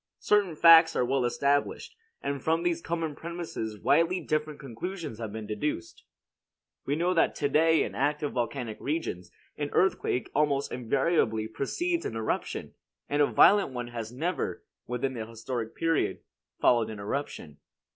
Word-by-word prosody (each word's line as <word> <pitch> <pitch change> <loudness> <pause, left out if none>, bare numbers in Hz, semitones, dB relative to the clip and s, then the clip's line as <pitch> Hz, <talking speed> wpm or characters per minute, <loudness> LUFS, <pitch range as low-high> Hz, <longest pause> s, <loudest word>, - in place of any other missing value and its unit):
Certain 200 -5 +2
facts 165 0 +8
are 125 - +2
well 135 +1 +1
established; 140 +4 0 0.3
and 140 -1 -2
from 165 +1 +1
these 170 -1 0
common 165 -2 -2
premises 165 -11 -5
widely 165 - +3
different 155 -2 -2
conclusions 150 - -6
have 110 -3 -5
been 110 0 -6
deduced. 105 - -4 0.8
We 140 - +1
know 175 +3 +1
to 150 -4 +1
day 160 +2 +4
that - - +2
in - - -7
active 145 +1 0
volcanic 120 -2 -3
regions, 135 - -3 0.3
an 145 -1 -2
earthquake 180 -9 +1
almost 140 -1 +1
invariably 120 -3 +1
precedes 340 - -2
an 115 - -4
eruption; 110 -1 -3 0.4
and 145 +1 +1
a 145 - +5
violent 200 -9 +5
one 120 -1 -4
has 115 -2 -6
never, 165 +9 -3 0.2
within 125 +2 -2
the 110 -3 -5
historic 115 0 -5
period, 165 -2 0 0.4
followed 115 -3 +3
an 110 - -6
eruption. 100 - -5
140 Hz, 150 wpm, -28 LUFS, 115-165 Hz, 0.8 s, facts